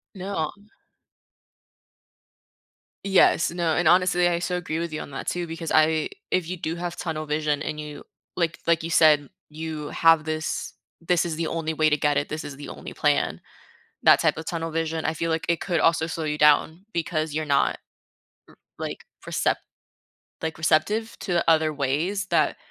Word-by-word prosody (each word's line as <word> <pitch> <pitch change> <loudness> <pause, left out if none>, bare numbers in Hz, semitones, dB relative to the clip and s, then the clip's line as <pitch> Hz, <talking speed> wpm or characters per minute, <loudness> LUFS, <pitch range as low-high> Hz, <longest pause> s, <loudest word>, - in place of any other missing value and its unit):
No. 185 -5 -3 2.5
Yes, 190 -4 +4
no, 170 -2 0
and, 175 -2 +2
honestly, 180 0 +4
I 170 -1 +1
so 180 +1 -2
agree 160 -2 -3
with 170 -1 -3
you 155 - -4
on - - -9
that 135 - -6
too, 175 -1 -2
because 165 0 -5
I 155 0 +3 0.2
if 185 -3 +1
you 185 - -3
do 160 0 -3
have 175 0 -5
tunnel 155 -3 -3
vision 150 -1 -1
and 150 - -4
you, 150 -1 -8 0.3
like 170 -2 -1
like 170 -1 +3
you 165 - -4
said, 150 -3 +5 0.2
you 155 -1 -6
have 165 -1 +4
this, 155 0 -3 0.3
"This 170 0 +1
is 160 -2 -3
the 165 - -1
only 160 -1 -2
way 155 0 +3
to 150 - +3
get 145 0 +1
it. 145 - 0
This 155 +1 -5
is 140 -2 -8
the 145 - -8
only - - -8
plan," - - +1 0.7
that - - +7
type - - +2
of 160 - -7
tunnel 165 -1 -3
vision, 160 0 -2
I 160 - +1
feel 165 +1 -2
like 160 0 -1
it 170 - +1
could 170 -4 0
also 165 -1 +3
slow 165 -1 -4
you 150 0 -2
down 160 +5 +3
because 160 -2 -1
you're 155 0 -1
not, 140 -2 +2 1.1
r - - -3
like, - - -7 0.2
percept - - -1 0.8
like, 160 -1 -3
receptive 210 +8 +1
to 180 -4 -1
other 160 -1 +4
ways 155 +8 -1
that - - +2
160 Hz, 180 wpm, -25 LUFS, 155-170 Hz, 2.5 s, that